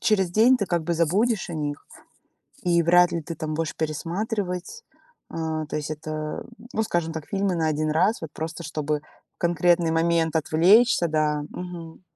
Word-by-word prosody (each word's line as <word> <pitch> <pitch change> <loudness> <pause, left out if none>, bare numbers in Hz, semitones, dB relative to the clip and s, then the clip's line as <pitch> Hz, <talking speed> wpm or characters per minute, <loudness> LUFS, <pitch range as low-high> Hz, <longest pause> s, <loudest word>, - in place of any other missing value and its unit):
через 195 -5 +2
день 230 +7 +5
ты 200 - -2
как 170 -2 0
бы 170 +2 -1
забудешь 195 +7 +1
о - - -4
них, 145 -2 -4 0.8
и 170 -1 +3
вряд 175 +1 +5
ли 170 -1 -2
ты 165 +2 -6
там 155 0 -4
будешь 160 0 -2
пересматривать. 180 - -3 0.5
А, 160 -1 -3
то - - -5
есть 150 0 -3
это, 155 0 -5 0.3
ну, 220 - +1
скажем 170 -5 -1
так, 160 -2 -6
фильмы 195 -2 0
на 160 -2 +1
1 155 0 0
раз, 185 +8 +2
вот 160 -3 -6
просто 160 +2 -5
чтобы 150 -2 -2 0.3
в - - -55
конкретный 170 0 +2
момент 165 -1 +1
отвлечься. 175 +6 +4
Да. 155 -1 +1
Мгм. 175 -2 -8
165 Hz, 175 wpm, -25 LUFS, 155-180 Hz, 0.8 s, день